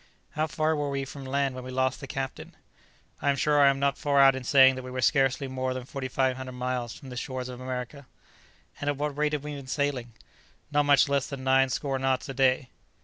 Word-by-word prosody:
"How 155 +1 -1
far 155 +1 0
were 145 -1 -2
we 135 -1 -2
from 135 0 -9
land 135 0 0
when 130 0 -7
we 130 - -8
lost 130 0 0
the 140 - -8
captain?" 135 0 -5 0.7
"I 145 - +1
am 140 - +3
sure 145 +2 +2
I 140 - +7
am 135 - +1
not 140 0 0
far 145 -2 +2
out 135 -1 +7
in 130 - -5
saying 130 0 +6
that 130 - -6
we 130 - -7
were 130 0 -5
scarcely 135 +2 +2
more 130 0 -2
than 130 -1 -5
4500 130 -1 -2
miles 125 -2 -3
from 135 - -11
the 125 - -8
shores 130 +1 -4
of 125 0 -8
America." 130 +2 -6 0.7
"And 145 - -1
at 145 - -1
what 145 0 -2
rate 150 +1 0
have 145 -2 -2
we 150 0 -5
been 140 -2 -8
sailing?" 130 -4 -2 0.6
"Not 145 0 +2
much 145 0 +5
less 140 -1 0
than 135 -2 -7
nine 135 0 +4
score 135 0 -2
knots 130 0 0
a - - -3
day." 130 -1 +2
135 Hz, 235 wpm, -27 LUFS, 130-140 Hz, 0.7 s, I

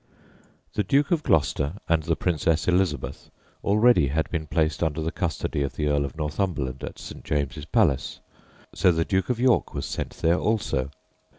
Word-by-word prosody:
The 105 - 0
Duke 140 - +2
of 170 -3 +2
Gloucester 75 - +1
and 80 -1 +2
the 80 +1 0
Princess 80 -2 0
Elizabeth 90 -6 0 0.3
already 105 - +4
had 80 +4 0
been 80 -2 -2
placed 80 -2 0
under 80 -2 0
the 80 +1 -2
custody 85 -5 -2
of 70 -2 -2
the 75 -1 0
Earl 70 -1 +2
of 70 +1 -8
Northumberland 75 -4 -2
at - - -6
St. - - -9
James's 70 -4 -2
Palace, 70 -1 +1 0.5
so 90 - +4
the 80 -1 0
Duke 95 +2 0
of 125 -2 0
York 125 -1 +2
was - - -3
sent - - -4
there 85 +2 +2
also. 85 - 0
80 Hz, 175 wpm, -25 LUFS, 75-95 Hz, 0.5 s, already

